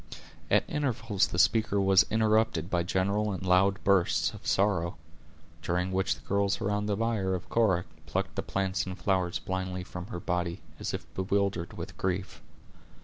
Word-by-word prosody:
At - - +4
intervals 120 -8 0
the - - -5
speaker 110 +1 +3
was 95 -3 +5
interrupted 110 -6 +2
by 90 - +2
general 100 +4 0
and 95 -1 -4
loud 95 +2 +4
bursts 85 -5 +3
of 105 +1 -10
sorrow, 95 -4 +1 0.6
during 90 +2 -1
which 95 +1 +1
the - - -18
girls 100 0 +1
around 105 0 -1
the 105 - +1
bier 105 -4 0
of 90 - -7
Cora 100 -7 +2 0.2
plucked - - -2
the - - -2
plants 95 -1 -1
and 95 0 -5
flowers 90 -2 0
blindly 95 0 -3
from 90 0 -7
her 110 -6 -5
body, 90 -2 -2 0.2
as - - -2
if - - -7
bewildered 95 -2 -1
with 90 +3 -8
grief. 95 +1 -2
95 Hz, 165 wpm, -29 LUFS, 90-100 Hz, 0.6 s, was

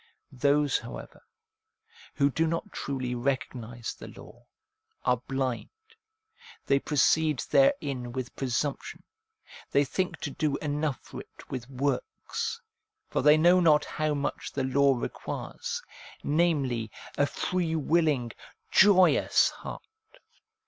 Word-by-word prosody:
Those, 140 +2 +2
however, - - -9 0.9
who 140 0 +3
do 165 +4 +1
not 165 +6 -3
truly 130 -3 -3
recognise 125 -2 -3
the - - -11
law, - - -14 0.6
are 125 -1 +2
blind, 130 -3 -2 1.0
they 140 0 +3
proceed 150 +1 +2
therein 140 - +2
with 130 0 -5
presumption, 135 +2 -2 0.7
they 140 +1 +3
think 185 +7 -2
to - - -3
do 150 -4 -1
enough 150 -2 -2
for - - -9
it - - -16
with 130 -1 -5
works; 140 - -2 0.5
for - - +1
they 150 +1 +6
know 175 +3 +6
not 155 -4 +4
how 155 -1 -1
much 145 0 -3
the 135 - -2
law 135 +1 +3
requires, 485 - -5 0.4
namely, 145 -8 +1 0.3
a 145 - +2
free 175 -1 -1
willing, 150 -6 +1 0.4
joyous 185 -2 +5
heart. - - -8
145 Hz, 115 wpm, -28 LUFS, 130-160 Hz, 1.0 s, they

